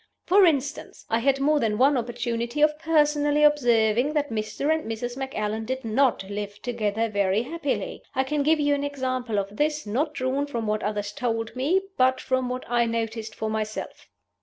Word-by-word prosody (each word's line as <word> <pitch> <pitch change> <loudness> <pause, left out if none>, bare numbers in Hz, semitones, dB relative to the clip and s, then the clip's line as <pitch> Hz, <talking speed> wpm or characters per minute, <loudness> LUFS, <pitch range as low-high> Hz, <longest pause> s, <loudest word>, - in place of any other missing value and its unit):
"For 390 +1 +6
instance, 290 -1 -2
I 225 - +3
had 275 +3 +2
more 295 +2 +3
than 215 -4 0
one 275 +4 +4
opportunity 235 +1 -2
of 300 0 +3
personally 295 -2 +2
observing 245 -2 +3
that 290 -4 -1
Mr. 220 +7 -1
and 315 -8 -3
Mrs. 240 +2 -4
Macallan 225 -5 -3
did 260 +2 -4
not 230 -3 +1
live 205 0 -5
together 225 -2 -1
very 200 0 +1
happily. 290 0 -3
I 265 - +2
can 295 +2 -1
give 310 +2 +3
you 290 0 +2
an 285 0 -1
example 255 -5 -2
of 200 +1 -3
this, 300 -1 0
not 290 +9 -1
drawn 265 +2 -1
from 235 -5 -3
what 215 0 0
others 205 -1 -2
told 225 0 -3
me, 315 +10 +1
but 255 0 +3
from 260 -1 -1
what 250 0 -4
I 240 0 +2
noticed 225 -1 -3
for 220 0 -3
myself. 215 0 -5
250 Hz, 185 wpm, -25 LUFS, 220-290 Hz, -, For